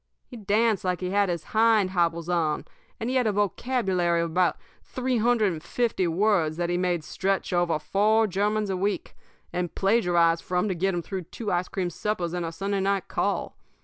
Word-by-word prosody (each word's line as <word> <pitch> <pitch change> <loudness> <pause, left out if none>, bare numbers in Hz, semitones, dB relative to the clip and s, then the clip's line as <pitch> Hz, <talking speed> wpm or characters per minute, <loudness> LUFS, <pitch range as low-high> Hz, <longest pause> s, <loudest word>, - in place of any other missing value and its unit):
He 250 - -12
danced 215 -1 +1
like 180 -1 -1
he 180 0 -3
had 200 -1 +2
hind 220 -3 +3
hobbles 170 -2 0
on; 165 -4 0 0.3
and 225 - -3
he 260 +1 +1
had 250 -3 +2
a - - +3
vocabulary 195 -4 0
of 170 -1 -2
about 180 +1 +2 0.2
three 255 -1 -2
hundred 225 -3 +3
and 160 -2 -6
fifty 205 +1 0
words 170 -3 +1
that 175 0 -1
he - - +1
made 180 -3 0
stretch 195 +3 -2
over 175 -2 +2
four 210 +8 +2
germans 205 +1 0
a 185 - -1
week, 200 +2 -2 0.4
and 180 -1 -3
plagiarized 175 -5 +2
from 180 +2 0
to - - +1
get 185 +2 0
him 175 - -2
through 190 -1 -5
two 210 +5 -5
ice 175 0 0
cream 180 -2 -3
suppers 180 -3 -2
and 175 -2 -2
a - - -4
Sunday 195 +4 -2
night 195 0 0
call. - - -1
190 Hz, 195 wpm, -26 LUFS, 175-210 Hz, 0.4 s, hind